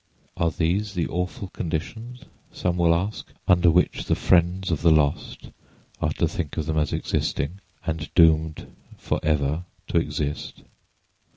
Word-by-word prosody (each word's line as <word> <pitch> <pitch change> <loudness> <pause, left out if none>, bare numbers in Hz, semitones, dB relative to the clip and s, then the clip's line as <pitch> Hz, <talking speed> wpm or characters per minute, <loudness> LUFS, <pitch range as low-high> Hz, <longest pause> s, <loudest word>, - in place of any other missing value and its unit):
Are 85 - +1
these 90 +7 -1
the 85 - 0
awful 90 +2 -3
conditions 110 +11 -5 0.3
(some 90 -1 -1
will 85 -1 +4
ask) 95 +5 -3 0.2
under 90 -1 +5
which 90 +2 +2
the - - +2
friends 90 +1 +2
of 80 - -1
the 85 - +5
lost 75 -2 +1 0.5
are - - +1
to - - +1
think 80 -5 -4
of 80 - -1
them 80 0 0
as 75 -2 0
existing, 85 +8 -1 0.3
and 80 -2 -3
doomed 80 -2 +4 0.3
forever 75 +2 0 0.2
to - - +1
exist? 75 -1 -4
85 Hz, 145 wpm, -24 LUFS, 80-90 Hz, 0.5 s, under